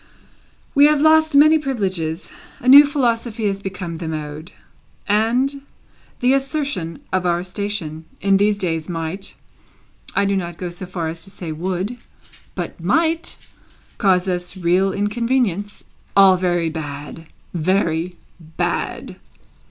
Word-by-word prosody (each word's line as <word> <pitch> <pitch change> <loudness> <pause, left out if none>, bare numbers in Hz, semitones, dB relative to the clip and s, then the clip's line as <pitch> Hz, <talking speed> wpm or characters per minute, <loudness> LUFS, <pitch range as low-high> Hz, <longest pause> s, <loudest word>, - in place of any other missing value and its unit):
We 285 0 +7
have 300 0 +4
lost 315 0 +4
many 310 +2 +7
privileges; 190 - -3 0.3
a - - -7
new 285 +3 +10
philosophy 235 -5 0
has 195 -1 -1
become 185 -4 -5
the 165 0 -5
mode; 155 +1 -6 0.6
and 245 +7 +1 0.6
the 250 +2 +4
assertion 275 - -2
of 185 -1 +1
our 175 0 +1
station, 180 -5 -4
in 195 -1 +3
these 205 +1 +2
days, 165 -4 -2
might 170 +3 -4 0.8
(I 200 - +3
do 200 0 +1
not 175 -3 -3
go 180 -2 -5
so 175 +1 -8
far 175 -3 -3
as 165 +1 -5
to 165 - -9
say 175 -4 -7
would, 185 +8 -3 0.6
but - - -6
might) 330 0 +1 0.6
cause 190 -3 +3
us 180 +1 -2
real 185 +2 +2
inconvenience. 205 -1 -1 0.3
All 195 -1 +8
very 175 -2 0
bad, 150 +1 -7 0.3
very 175 0 0 0.2
bad!" 160 -1 -3
190 Hz, 130 wpm, -20 LUFS, 170-235 Hz, 0.8 s, new